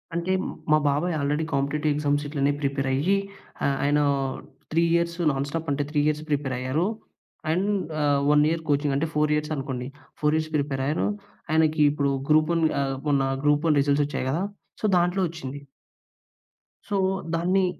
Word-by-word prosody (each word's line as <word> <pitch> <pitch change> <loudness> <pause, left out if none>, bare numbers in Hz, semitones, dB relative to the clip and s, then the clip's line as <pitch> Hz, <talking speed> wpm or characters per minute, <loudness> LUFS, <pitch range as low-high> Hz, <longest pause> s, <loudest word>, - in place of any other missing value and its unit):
అంటే 170 +2 -1 0.4
మా 155 - +7
బాబాయ్ 160 +5 0
ఆల్రెడీ 145 +2 0
కాంపిటేటివ్ 145 +2 0
ఎగ్జామ్స్ 145 0 0
ఇట్లనే 140 -1 +1
ప్రిపేర్ 140 -1 -1
అయ్యి 180 +9 +2 0.5
ఆ - - +4 0.2
ఆయన 145 +1 +3 0.7
3 165 +2 +3
ఇయర్స్ 170 0 0
నాన్ 135 +1 -1
స్టాప్ 165 +1 -4
అంటే 145 +1 0
3 150 -1 0
ఇయర్స్ 155 0 0
ప్రిపేర్ 140 -3 0
అయ్యారు. 130 +7 0 0.7
అండ్ 185 +5 +1 0.3
ఆహ్ 145 -1 +2
1 150 0 +5
ఇయర్ 165 0 -1
కోచింగ్. 145 -1 +2
అంటే 160 +4 0
4 150 0 +2
ఇయర్స్ 150 +1 -2
అనుకోండి. 130 -2 -4 0.3
4 155 +1 +1
ప్రిపేర్ 140 -2 -1
అయ్యారు. 150 +3 0 0.4
ఆయనకి 155 -1 +3
ఇప్పుడు 140 -1 0 0.2
గ్రూప్-1 155 +2 +3 0.2
ఆహ్ 135 -1 -1
మొన్న 140 -2 +3 0.2
గ్రూప్-1 150 +2 +3
రిజల్ట్స్ 145 +1 +2
వచ్చాయి 135 -2 -3
కదా! 165 +8 0 0.4
సో, - - -2
దాంట్లో 175 +2 +1
వచ్చింది. 145 -4 -7 1.3
సో, 205 - -1 0.4
దాన్ని 185 +3 +2
150 Hz, 155 wpm, -25 LUFS, 140-165 Hz, 1.3 s, మా